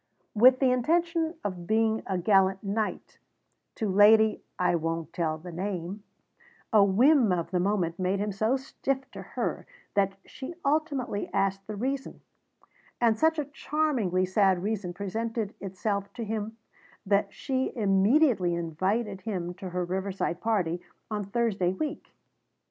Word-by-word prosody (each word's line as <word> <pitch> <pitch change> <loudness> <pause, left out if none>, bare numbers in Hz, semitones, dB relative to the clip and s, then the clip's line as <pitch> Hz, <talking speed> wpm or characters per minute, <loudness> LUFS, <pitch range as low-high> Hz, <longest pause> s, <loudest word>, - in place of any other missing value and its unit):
With 250 +4 +7
the 260 -1 +3
intention 330 +5 +1
of 180 -4 -4
being 220 0 +2
a 190 - -1
gallant 190 +1 +3
knight 210 +2 -3 0.6
to 220 - -2
Lady 215 +3 +5 0.2
I 180 -1 +2
Won't 165 -1 -2
Tell 160 -2 -1
the 175 +3 -9
Name, 185 +2 -4 0.7
a 210 -2 +7
whim 235 +4 +4
of 175 -2 -1
the 180 - +1
moment 180 -3 0
made 185 +2 +1
him 205 +1 -1
so 220 +6 +1
stiff 265 0 -3
to - - -8
her - - -4 0.3
that 195 -1 +2
she 270 +6 -8
ultimately 280 -7 -1
asked 195 0 0
the 215 - -5
reason; 265 +5 -3 0.8
and 230 -2 +4
such 320 +6 +2
a 300 - -1
charmingly 270 - 0
sad 190 -1 +2
reason 205 -4 -2
presented 220 +3 -3
itself 200 +1 -3
to 235 - -5
him 220 0 -4 0.5
that 200 0 +2
she 260 -1 -2
immediately 205 - +3
invited 190 +5 -1
him 180 -5 -3
to 185 +1 -7
her 180 0 -2
riverside 185 -1 -2
party 180 -7 0 0.3
on 210 -1 -2
Thursday 200 -4 0
week. 300 +10 -5
205 Hz, 145 wpm, -28 LUFS, 185-235 Hz, 0.8 s, With